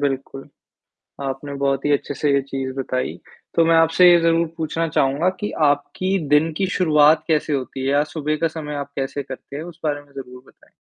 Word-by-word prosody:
बिल्कुल, 135 0 -3 0.7
आपने 135 +1 -4
बहुत 135 0 0
ही 145 - +2
अच्छे-से 145 +1 0
ये 140 - +3
चीज़ 135 -1 -4
बताई, 130 -1 -2 0.4
तो 165 - +4
मैं 165 0 +4
आपसे 165 +2 +6
ये 175 - +6
ज़रूर 165 0 +2
पूछना 165 +1 -2
चाहूँगा 145 +3 +1
कि 210 - -3 0.2
आपकी 185 +7 -1 0.2
दिन 160 +2 +3
की 195 - 0
शुरुआत 155 -3 +4
कैसे 155 -2 +1
होती 135 -1 -3
है 135 - +1
या 145 +1 +3
सुबह 155 -1 -1
का 165 - +3
समय 155 -2 -6
आप 140 0 -5
कैसे 135 +1 -3
करते 130 +1 -9
हैं? 150 - -4
उस 170 -1 -11
बारे 145 -1 -1
में 145 -1 -23
ज़रूर 125 -2 -10
बताएँ। - - -23
145 Hz, 200 wpm, -21 LUFS, 135-165 Hz, 0.7 s, आपसे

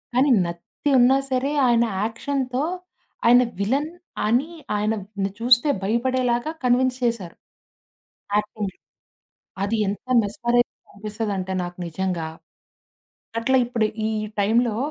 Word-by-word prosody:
కానీ 265 +3 +4 0.2
నత్తి 170 +11 -5
ఉన్నా 255 +2 +6
సరే 260 +2 +1 0.2
ఆయన 235 -1 +4 0.2
యాక్షన్‌తో, 255 +3 -2 0.6
ఆయన 245 +1 +7 0.2
విలన్ 275 +10 0 0.4
అని 250 +9 +2 0.3
ఆయన‌ని 205 -2 -2
చూస్తే 245 +4 +4
భయపడేలాగా 240 +4 +1
కన్విన్స్ 250 +1 +3
చేశారు. 220 -8 -2 1.0
యాక్టింగ్. 210 -1 -2 0.9
అది 215 +3 0
ఎంత 200 - -4 0.2
మెస్మరైజింగ్‌గా 240 +4 -1
అనిపిస్తదంటే 205 -2 -3
నాకు 175 0 -6
నిజంగా. 175 -1 -2 1.1
అట్లా 260 +3 +3
ఇప్పుడు 230 -3 +1 0.2
ఈ - - -1 0.3
టైంలో 225 +2 +2
230 Hz, 100 wpm, -23 LUFS, 205-250 Hz, 1.1 s, ఆయన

